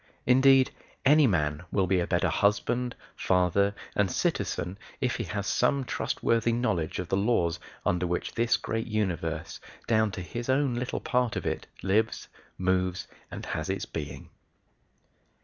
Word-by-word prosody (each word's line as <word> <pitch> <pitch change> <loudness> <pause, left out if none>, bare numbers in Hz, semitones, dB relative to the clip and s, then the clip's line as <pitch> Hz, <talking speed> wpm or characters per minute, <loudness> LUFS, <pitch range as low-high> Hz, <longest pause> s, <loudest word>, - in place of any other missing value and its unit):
Indeed, 130 +1 +5 0.3
any 150 +1 +6
man 75 -6 0
will 95 -2 +2
be 95 0 +2
a 85 - -1
better 90 -1 +1
husband, 120 +4 +1 0.2
father, 95 +2 +2 0.2
and 100 -2 +2
citizen, 90 +3 -1 0.2
if 125 - 0
he 115 - -3
has 100 +3 -3
some 135 +5 +2
trustworthy 115 -1 0
knowledge 95 -10 0
of 90 - -3
the 95 - +1
laws 100 -6 +1 0.3
under 90 0 +1
which 90 +1 -2
this 115 -1 +2
great 115 0 -3
universe, 95 -7 -2 0.3
down 110 -1 +3
to 95 - -4
his 120 +7 -6
own 135 -1 +2
little 120 +2 -3
part 125 -2 0
of - - -3
it, - - -2 0.2
lives, 105 +3 +1 0.3
moves, 90 0 0 0.2
and - - -7
has - - -3
its - - -2
being. 70 -3 -6
105 Hz, 150 wpm, -28 LUFS, 90-120 Hz, 0.3 s, any